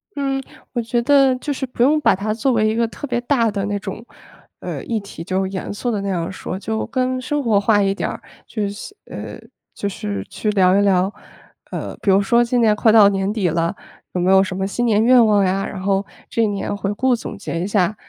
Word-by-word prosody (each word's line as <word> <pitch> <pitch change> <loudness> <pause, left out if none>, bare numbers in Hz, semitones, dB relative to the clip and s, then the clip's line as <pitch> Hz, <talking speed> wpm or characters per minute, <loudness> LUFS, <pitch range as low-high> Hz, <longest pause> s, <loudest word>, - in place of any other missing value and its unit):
嗯， 275 -1 -1 0.3
我 240 - 0
觉 235 +1 0
得 270 +1 +4
就 290 +3 -3
是 265 - -3
不 250 -2 -6
用 295 +5 +4
把 - - +4
它 210 +3 -2
作 235 +5 0
为 220 -3 +2
一 215 - 0
个 230 0 +2
特 290 +5 -7
别 240 -2 -1
大 240 -2 +2
的 200 -2 -2
那 205 0 -2
种， 210 +3 -7 0.5
呃， - - -5
议 230 -2 -2
题。 200 -5 -9
就 190 +2 -1
严 190 +1 -5
肃 245 +4 -3
的 210 -4 -1
那 200 - -3
样 175 -2 -2
说， 190 -1 -6
就 220 +2 -2
更 255 0 -1
生 290 +3 -1
活 225 -6 +2
化 205 0 +3
一 195 0 +1
点 - - -2
儿。 - - -7 0.2
就 215 -3 -3
是， 205 - -8
呃， - - -8 0.3
就 200 - -3
是 105 - -4
去 215 - -3
聊 190 -2 +4
一 - - +4
聊， 190 -1 +2 0.6
呃， - - -5
比 200 - +2
如 195 +1 +5
说 235 +4 +3
今 245 +1 0
年 220 -3 +4
快 220 +1 +4
到 215 -2 +8
年 195 0 0
底 210 -4 0
了， 165 0 0 0.4
有 180 - -2
没 180 - +2
有 190 0 +6
什 185 -1 -4
么 190 +1 -1
新 240 +5 -1
年 215 -2 +3
愿 245 +1 +6
望 205 -2 +3
呀， 195 +1 0
然 195 - -6
后 195 +1 0 0.2
这 230 - +1
一 - - +3
年 205 0 -3
回 200 0 -2
顾 255 +4 +2
总 225 - -7
结 185 -4 -4
一 185 - -2
下。 200 -1 +1
210 Hz, 260 characters per minute, -20 LUFS, 195-240 Hz, 0.6 s, 到